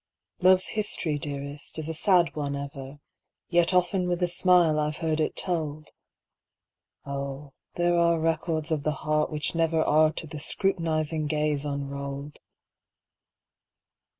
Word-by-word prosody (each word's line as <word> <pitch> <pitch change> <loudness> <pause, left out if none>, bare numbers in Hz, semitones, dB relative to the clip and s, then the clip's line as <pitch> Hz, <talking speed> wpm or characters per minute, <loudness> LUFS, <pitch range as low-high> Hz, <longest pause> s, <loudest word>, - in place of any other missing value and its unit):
Love's 185 0 +5
history, 170 -8 -1
dearest, 140 +1 -5
is 160 -1 -4
a 160 - -2
sad 175 -1 +3
one 145 -2 -2
ever, 140 0 -7 0.5
Yet 175 0 +4
often 180 0 +2
with 175 0 -1
a - - +3
smile 175 -3 +3
I've 150 0 -1
heard 160 -2 -1
it 155 - 0
told! 155 -4 -3 1.1
Oh, 140 0 -5 0.2
there 175 0 +2
are 170 -1 +3
records 160 0 -1
of 155 -2 0
the 155 - 0
heart 155 0 +1
which 150 0 -2
never 165 -1 +1
Are 155 +1 +4
to 160 - -5
the 155 -1 -7
scrutinizing 160 -3 0
gaze 150 -1 0
unrolled! 140 0 -5
155 Hz, 135 wpm, -27 LUFS, 145-170 Hz, 1.1 s, Love's